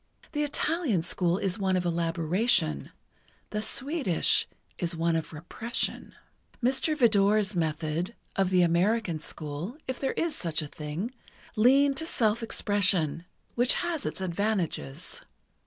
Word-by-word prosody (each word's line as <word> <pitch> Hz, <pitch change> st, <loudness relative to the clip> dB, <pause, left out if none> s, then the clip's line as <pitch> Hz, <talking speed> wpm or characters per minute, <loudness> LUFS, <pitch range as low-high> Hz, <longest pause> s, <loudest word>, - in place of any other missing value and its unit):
The 295 Hz, -2 st, -1 dB
Italian 295 Hz, -, 0 dB
school 175 Hz, 0 st, +1 dB
is 195 Hz, 0 st, -1 dB
one 190 Hz, -1 st, +1 dB
of 180 Hz, -, -1 dB
elaboration; 165 Hz, -, +1 dB, 0.6 s
the 210 Hz, -, -1 dB
Swedish 260 Hz, -, +1 dB, 0.3 s
is 170 Hz, -1 st, -1 dB
one 165 Hz, 0 st, +1 dB
of 160 Hz, -, -2 dB
repression. 180 Hz, +9 st, -4 dB, 0.4 s
Mr. 270 Hz, +5 st, +1 dB
Vidor's 210 Hz, -4 st, +4 dB
method—of 170 Hz, +4 st, -1 dB
the 185 Hz, -1 st, +4 dB
American 175 Hz, +1 st, +2 dB
school, 155 Hz, -, -6 dB
if 260 Hz, -1 st, -3 dB
there 270 Hz, -, 0 dB
is 335 Hz, -2 st, -1 dB
such 165 Hz, -3 st, -2 dB
a -, -, -5 dB
thing—leaned 240 Hz, -, 0 dB
to 320 Hz, -, -2 dB
self 225 Hz, -6 st, +1 dB
expression, 195 Hz, -7 st, +1 dB, 0.3 s
which 245 Hz, +1 st, +3 dB
has 345 Hz, -3 st, -2 dB
its -, -, -4 dB
advantages. 180 Hz, -, -2 dB
195 Hz, 125 wpm, -28 LUFS, 165-240 Hz, 0.6 s, Vidor's